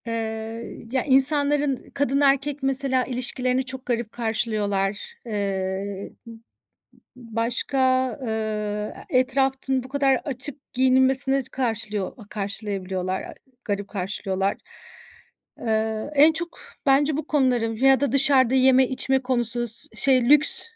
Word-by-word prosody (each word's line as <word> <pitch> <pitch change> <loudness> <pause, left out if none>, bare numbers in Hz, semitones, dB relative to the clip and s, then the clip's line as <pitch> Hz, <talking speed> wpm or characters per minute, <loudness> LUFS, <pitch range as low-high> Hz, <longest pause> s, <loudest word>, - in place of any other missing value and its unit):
Eee, 225 0 -5
ya, 260 -1 0
insanların 285 0 +3
kadın 280 0 +1
erkek 280 0 +1
mesela 270 -1 +2
ilişkilerini 255 +1 -1
çok 265 0 -7
garip 235 -2 -2
karşılıyorlar. 210 -4 -2
Eee, 195 -2 -3
m 230 - -10
m 225 - -14 0.8
başka, 235 +2 -2 0.4
eee, 215 -2 -3
e 255 - +3
etrafın 265 0 0
bu 255 - -11
kadar 275 0 +2
açık 270 0 -7
giyinilmesine 260 +1 +3
s 255 - -7
karşılıyor 220 -5 -2
a 220 - -13
karşılayabiliyorlar, 195 -3 -3
a - - -9 0.3
garip 205 -2 -3
karşılıyorlar. 195 0 -2 1.0
Eee, 220 +1 -1
en 300 +3 +6
çok 340 +2 -6 0.3
bence 280 +2 +3
bu 305 - -4
konuların 245 -6 +1
ya 265 +2 +4
da 285 - 0
dışarda 265 -2 +4
yeme 260 0 +5
içme 265 0 0
konusu 240 -2 0
s 225 - -2
şey, 255 0 +3
lüks 295 0 +5
250 Hz, 125 wpm, -24 LUFS, 220-270 Hz, 1.0 s, en